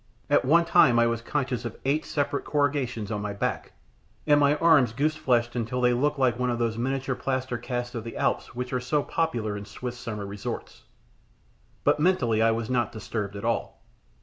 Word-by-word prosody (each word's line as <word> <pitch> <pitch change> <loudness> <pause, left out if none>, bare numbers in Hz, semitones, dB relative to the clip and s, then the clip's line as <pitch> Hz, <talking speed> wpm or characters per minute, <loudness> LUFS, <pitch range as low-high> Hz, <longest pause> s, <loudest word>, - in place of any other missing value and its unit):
At - - +4
one 170 +6 +4
time 125 -7 +5
I 120 - +5
was 115 -1 0
conscious 130 -1 -2
of 120 -2 -6
eight 145 +3 +1
separate 145 -1 -1
corrugations 135 -7 -1
on 105 -1 -2
my 105 0 -3
back, 100 - -3 0.5
and 145 -1 +5
my 145 0 +4
arms 150 -7 +4
goose 150 +5 0
fleshed 120 -6 +1
until 120 +1 -2
they 125 -1 +3
looked 145 +4 +1
like 125 -3 +2
one 125 0 +1
of 120 - 0
those 115 -2 0
miniature 135 +3 -1
plaster 130 -1 -2
casts 120 0 -4
of 115 - -4
the 115 - -7
Alps - - -1
which 125 +1 -4
are 125 - +1
so 135 +4 0
popular 120 -11 -1
in 100 - -5
Swiss 120 +4 -7
summer 105 -4 -5
resorts; 100 0 -6 1.0
but - - +3
mentally 140 -10 +2
I 115 - +5
was 115 0 -1
not 120 -3 0
disturbed 105 -2 -4
at 100 - -6
all. 115 - -2
125 Hz, 200 wpm, -26 LUFS, 115-140 Hz, 1.0 s, time